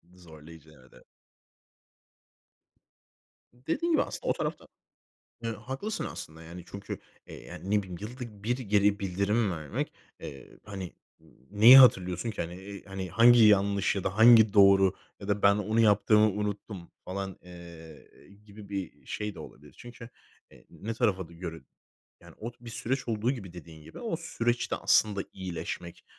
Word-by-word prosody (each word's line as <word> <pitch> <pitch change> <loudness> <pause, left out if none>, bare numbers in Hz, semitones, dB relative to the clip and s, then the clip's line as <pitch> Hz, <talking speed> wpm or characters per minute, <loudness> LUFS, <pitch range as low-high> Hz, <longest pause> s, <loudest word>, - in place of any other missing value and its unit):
Zorlayıcı, 80 -2 -15
evet, 65 - -21
eve - - -18 2.5
Dediğin 160 - -2
gibi 320 - +4
aslında - - -8
o - - +3
tarafta - - -5 0.8
Eee, 115 - -2
haklısın 130 - -5
aslında, 80 +1 -8
yani, 85 +1 -10
çünkü, 100 0 -7 0.3
eee, - - -11
yani, 95 - -8
ne 105 - +3
bileyim, 90 -2 -9
yılda 110 -2 -9
1 120 +3 -1
geri 105 -3 +2
bildirim 100 +3 0
vermek, 80 -4 -4 0.3
eee, 70 -1 -11
hani 95 -3 -7 0.6
neyi 115 +6 +9
hatırlıyorsun 95 -4 +4
ki? 110 - -4
Hani, 85 +1 -7 0.4
eee, 95 -1 -4
hangi 115 +5 +6
yanlış 100 -1 +3
ya 95 - -3
da 95 - -2
hangi 110 -2 +7
doğru 95 -2 +6 0.3
ya 100 - -9
da 100 0 -1
"Ben 100 0 +6
onu 110 +2 0
yaptığımı 105 0 +4
unuttum." 100 -3 -5
falan, 95 0 -5
eee, 85 -3 -13 0.4
gibi 105 -1 -13
bir 95 -3 -6
şey 105 -1 -4
de - - -12
olabilir. - - -13
Çünkü, 120 -1 -11 0.4
eee, - - -19
ne 115 +2 -6
tarafa 95 -8 0
d 85 - -15
göre, 85 -2 -7 0.6
yani, - - -16
o 115 +2 -5
bir 120 -1 -10
süreç 125 +3 -3
olduğu 115 +1 0
gibi, 95 -9 -8
dediğin 80 -3 -12
gibi, - - -12
o 225 -8 -3
süreçte 120 -7 -2
aslında 105 -2 +2
iyileşmek, 85 -2 -7
100 Hz, 150 wpm, -28 LUFS, 90-115 Hz, 2.5 s, neyi